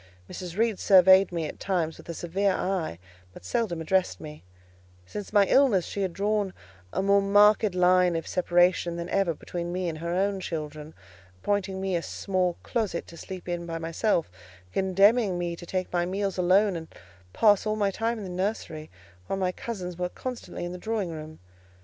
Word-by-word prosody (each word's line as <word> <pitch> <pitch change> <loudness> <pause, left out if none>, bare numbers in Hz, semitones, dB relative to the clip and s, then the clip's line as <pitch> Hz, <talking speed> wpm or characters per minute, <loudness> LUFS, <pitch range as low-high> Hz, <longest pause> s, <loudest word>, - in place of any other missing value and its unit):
Mrs. 180 0 -7
Reed 225 -2 +1
surveyed 190 0 +6
me 170 -2 -2
at - - -7
times 170 -5 -1
with - - -14
a 170 - -4
severe 190 +4 0
eye, 180 - -2 0.4
but 90 - -13
seldom 175 - -1
addressed 185 +3 +1
me: 150 - -10 0.6
since 205 - -7
my 205 -2 +5
illness, 225 -8 +4
she 200 - -4
had 190 -2 0
drawn 200 0 -1 0.4
a 190 - -1
more 200 0 +4
marked 205 0 +4
line 180 -1 +4
of 165 - -2
separation 175 -1 +2
than 170 0 -4
ever 190 -5 +1
between 175 +2 -5
me 180 0 -2
and 160 -2 -4
her 170 +1 -4
own 195 +3 0
children; 155 -3 -6 0.4
appointing 195 - -1
me 190 -1 -1
a 170 - 0
small 185 -1 -1
closet 215 -8 -2
to 170 - -13
sleep 185 +2 -8
in 175 -1 -3
by 165 0 -3
myself, 165 - 0 0.4
condemning 195 +1 +3
me 175 -1 -2
to 175 0 -11
take 185 0 -3
my 175 -1 +2
meals 195 +1 -2
alone, 190 +2 +4
and 165 -1 -6 0.4
pass 210 - +4
all 215 - +1
my 205 -2 +1
time 225 +4 -1
in 215 - -6
the 190 - -6
nursery, 180 -5 -3 0.4
while 195 - -2
my 185 -1 0
cousins 180 -4 -6
were 180 0 -1
constantly 250 -5 -6
in 175 - -5
the 180 - -7
drawing 215 -4 -2
room. 155 0 -8
185 Hz, 185 wpm, -27 LUFS, 170-200 Hz, 0.6 s, surveyed